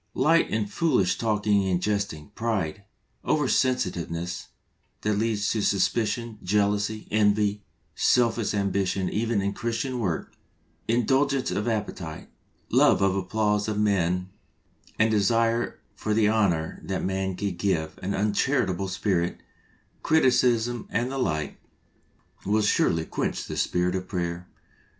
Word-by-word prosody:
Light 160 +5 +3
and 110 -1 -1
foolish 100 - +1
talking 105 -2 +2
and 90 -2 +1
jesting, 100 -7 -2
pride, 100 -5 -2 0.4
oversensitive 130 - +1
ness 85 +2 -5 0.5
that 105 - +1
leads 105 0 0
to 110 - 0
suspicion, 110 +2 0
jealousy, 105 +2 0
envy, 105 -1 +2 0.3
selfish 115 +1 +2
ambition 100 -1 0
even 110 -2 0
in 100 +1 -1
Christian 120 +3 -2
work, 90 -8 -2 0.5
indulgence 130 +4 +2
of 105 +3 -2
appetite, 100 -8 -4 0.4
love - - +4
of 95 -1 +3
the 100 - 0
applause 105 0 0
of 110 -1 -2
men 90 -3 +1 0.7
and 110 +1 +3
desire 115 +3 +1
for 105 -1 -2
the 110 -1 +4
honour 95 -8 +1
that 95 -1 -3
man 95 0 -1
can 100 -1 -3
give, 85 -4 -1
an 95 +2 -2
uncharitable 100 -2 +1
spirit, 90 -2 -1 0.6
criticism 120 -5 +2
and 120 +3 -1
the 135 - -3
like, 75 - -2 0.8
will 105 +2 +1
surely 85 -5 +2
quench - - -3
the - - -6
spirit 90 0 0
of 95 -1 -3
prayer. 90 -2 -3
105 Hz, 125 wpm, -26 LUFS, 95-115 Hz, 0.8 s, love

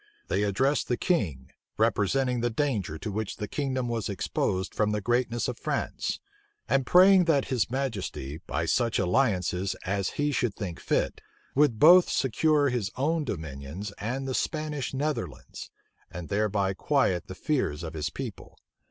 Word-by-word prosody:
They - - +1
addressed 130 +8 +1
the 120 - 0
king, 80 - -1 0.3
representing 125 +4 +2
the 120 - +1
danger 110 - -1
to 105 - -5
which 105 0 -3
the 105 - -4
kingdom 130 -2 -2
was 115 -3 -2
exposed 95 -1 -1
from 105 -1 +1
the 105 - 0
greatness 120 +2 0
of 125 - -4
France; - - -2 0.5
and 135 -2 +1
praying 185 0 +7
that 145 -5 +2
his 120 -4 +1
majesty, 105 - -3
by 80 +4 -1
such 115 +7 +1
alliances 95 -2 +1
as 95 0 -1
he 145 0 +1
should 120 -6 0
think 90 -6 -5
fit, - - -1 0.3
would 145 -5 +3
both 175 +8 +7
secure 145 +3 +2
his 120 -6 -1
own 150 +4 0
dominions 80 - -5
and 130 +5 -3
the 130 - -2
Spanish 150 -2 -2
Netherlands, 135 - -4 0.4
and 90 -2 -8
thereby 100 -1 +1
quiet 95 - +1
the 95 - -7
fears 95 - -1
of 80 0 -5
his 75 -2 -2
people. - - -8
115 Hz, 155 wpm, -27 LUFS, 95-135 Hz, 0.5 s, praying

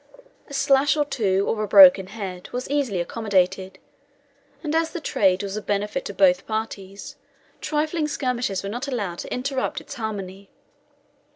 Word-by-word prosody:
A 280 - -12
slash 275 +2 +3
or 295 - +2
two, 200 -8 0
or 215 - -1
a 215 - -2
broken 190 -1 +8
head, 190 -3 -7
was 250 +1 -4
easily 270 -10 0
accommodated, 190 -1 -1 0.9
and 300 -1 -2
as 325 0 +1
the 345 - -6
trade 190 - +1
was 200 0 -4
of 215 - -6
benefit 205 0 -1
to 200 - -5
both 180 -1 +3
parties, 205 -3 -5 0.4
trifling 310 +1 -1
skirmishes 250 -9 -2
were - - -4
not 245 +6 -4
allowed 205 -10 -3
to - - -7
interrupt 265 +3 -2
its - - -10
harmony. 200 -5 -6
215 Hz, 160 wpm, -23 LUFS, 195-270 Hz, 0.9 s, broken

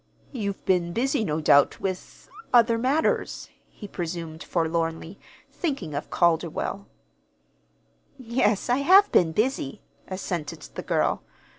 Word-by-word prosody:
"You've 200 -7 -4
been 175 -2 +1
busy, 265 +2 0
no 155 -5 -1
doubt, 145 -2 +4
with 185 -1 -5 0.2
other 230 -1 +5
matters," 275 +6 0 0.2
he 205 - -10
presumed 170 -3 -5
forlornly, 165 +1 -2 0.3
thinking 270 - -3
of 145 - -4
Calderwell. 170 +3 0 1.3
"Yes, 235 -5 0
I 245 0 +2
have 380 +9 +6
been 165 -2 +4
busy," 215 - -1 0.2
assented 180 -5 -4
the - - -5
girl. - - 0
190 Hz, 115 wpm, -25 LUFS, 165-240 Hz, 1.3 s, have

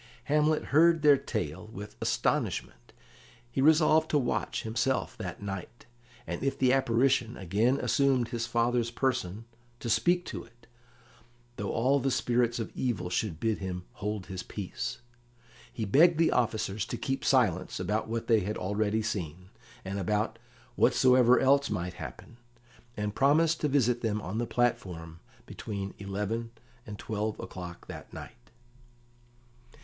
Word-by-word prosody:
Hamlet 150 +1 +2
heard 165 +1 +5
their 145 -1 +8
tale 105 - -4
with 105 -1 -8
astonishment. - - -1 0.6
He 135 - -1
resolved 155 +1 +5
to 150 - +3
watch, 125 -4 -1
himself, 115 +4 -1
that - - -6
night, 100 +4 -6 0.4
and - - -4
if 135 - 0
the 130 -1 +3
apparition 125 -2 +2
again 105 +8 +1
assumed 135 -4 +2
his 115 -1 -3
father's 120 0 +1
person, 115 -5 -2 0.3
to 115 - -2
speak 175 +6 +2
to - - -6
it, 120 0 -21 0.9
though 100 - -3
all 130 +5 +2
the 135 +1 0
spirits 120 -2 +1
of 115 - -4
evil 100 -9 -2
should 90 -3 -1
bid 110 +1 0
him 90 -2 -4
hold 105 -2 -4
his 95 -1 -6
peace. 95 +3 -5 0.7
He 110 - -3
begged 155 - +5
the 165 0 +3
officers 110 -4 0
to - - -4
keep 135 0 -2
silence 110 -10 +2
about 105 +4 -1
what 115 0 -3
they 115 -2 +4
had 105 +2 -3
already 105 +3 0
seen, 90 -4 -4 0.3
and 100 +1 -3
about 105 +3 -1 0.4
whatsoever 125 -1 +5
else 140 +1 +3
might 90 0 -3
happen, 120 - -9 0.6
and 105 0 -2
promised 155 +6 +3
to 150 - +2
visit 125 -4 +2
them 110 -2 0
on 105 +2 -4
the 120 - -1
platform 90 -9 -1 0.3
between 100 -2 -6
eleven 105 +4 -3 0.4
and 105 -1 -7
twelve 110 0 -3
o'clock 90 -2 -8
that - - -9
night. - - -11
115 Hz, 145 wpm, -29 LUFS, 100-130 Hz, 0.9 s, their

